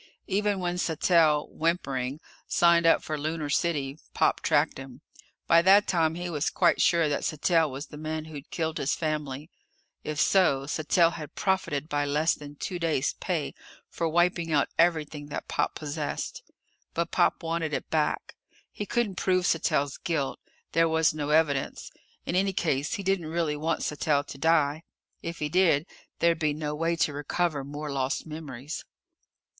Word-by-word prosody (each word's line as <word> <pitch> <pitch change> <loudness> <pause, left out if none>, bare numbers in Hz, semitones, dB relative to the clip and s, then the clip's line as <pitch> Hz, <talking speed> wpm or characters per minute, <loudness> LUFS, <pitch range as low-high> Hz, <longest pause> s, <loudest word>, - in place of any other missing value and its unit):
Even 205 0 0
when 180 0 -2
Sattell 160 -2 +3
whimpering 140 -5 -1 0.3
signed 170 -1 +4
up 165 - +4
for 155 -1 -3
Lunar 155 0 -3
City, 145 -3 0 0.2
Pop - - +2
tracked - - +2
him. 135 0 -10 0.4
By 170 - +6
that 195 +3 +6
time 165 -3 +2
he 175 +1 -4
was 155 -3 -1
quite - - +2
sure 170 -2 +4
that 145 - -1
Sattell 160 +1 +2
was 135 +3 -6
the 150 - -11
man 155 0 -4
who'd 150 -3 -9
killed 160 -2 -2
his 135 - 0
family. 150 -1 -3 0.5
If 150 -1 -4
so, 140 -9 +3
Sattell 160 +3 +2
had 155 -2 -8
profited 170 -7 0
by 145 -2 0
less 150 +3 +2
than 145 0 -10
two 180 +4 -4
days' 160 -5 0
pay - - -2 0.4
for 165 - -2
wiping 175 0 +1
out 145 -2 +2
everything 155 -3 +1
that 145 - -6
Pop - - -1
possessed. 150 0 -4 0.5
But 170 0 -1
Pop - - +2
wanted 165 -1 -1
it - - -4
back. 155 -2 0 0.4
He 205 - -6
couldn't 225 -6 -1
prove 185 -1 +1
Sattell's 145 -4 +1
guilt. 160 -7 -2 0.3
There 165 0 +3
was 160 -1 +3
no 150 -1 -3
evidence. 150 -3 +1 0.3
In 175 - -2
any 195 +1 +2
case, 150 -5 0
he 205 -3 -3
didn't 190 -4 0
really 160 -2 -1
want 160 +2 -1
Sattell 145 -1 +1
to 140 - -9
die. 155 -1 +2 0.4
If 170 0 -5
he 150 - -2
did, 165 -2 +3 0.3
there'd 170 -1 +2
be 155 -3 +1
no 150 0 -3
way 165 +2 0
to 155 -2 +1
recover 145 +1 -1
more 145 +2 -6
lost 135 -1 -1
memories. 150 -3 -7
155 Hz, 165 wpm, -27 LUFS, 145-170 Hz, 0.5 s, By